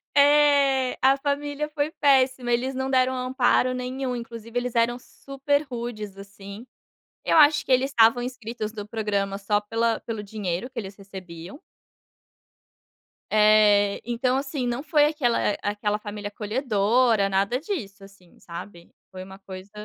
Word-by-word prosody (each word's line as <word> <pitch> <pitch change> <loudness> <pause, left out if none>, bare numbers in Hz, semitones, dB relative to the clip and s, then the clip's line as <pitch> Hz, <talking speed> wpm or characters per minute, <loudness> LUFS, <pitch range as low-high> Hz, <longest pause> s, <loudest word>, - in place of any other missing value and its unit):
É. 285 -2 +4
A 270 +1 +4
família 290 +1 -3
foi 300 0 -2
péssima, 260 -4 +2
eles 255 +3 0
não 265 +1 -2
deram 260 0 +2
amparo 255 0 +1
nenhum. 255 0 -4
Inclusive, 230 0 -7
eles 245 -1 -3
eram 235 +1 +2
super 275 +3 -2
rudes, 230 -6 -7
assim. 200 +2 -11 0.6
Eu - - +2
acho 300 -1 +5
que - - 0
eles 260 +2 +2
estavam 230 -1 +4
inscritos 240 -3 -6
no 210 -2 -7
programa 200 -3 -2
só 205 +1 0
pela 225 +2 -1
pelo 220 -2 -6
dinheiro 205 +2 -4
que 250 - -9
eles 195 -2 -6
recebiam. 190 - -10 1.7
Eh, 210 -1 +4
então, 245 +2 -1
assim, 275 -2 -2
não 240 +3 -3
foi 295 -1 +3
aquela 295 -6 0 0.2
aquela 205 0 -1
família 210 -1 -7
acolhedora, 220 -1 +1
nada 200 +7 0
disso 215 - -6
assim, 195 -3 -18
sabe. 170 0 -10 0.2
Foi 185 -1 -9
uma 190 +1 -12
coisa 190 0 -11
235 Hz, 140 wpm, -24 LUFS, 205-265 Hz, 1.7 s, acho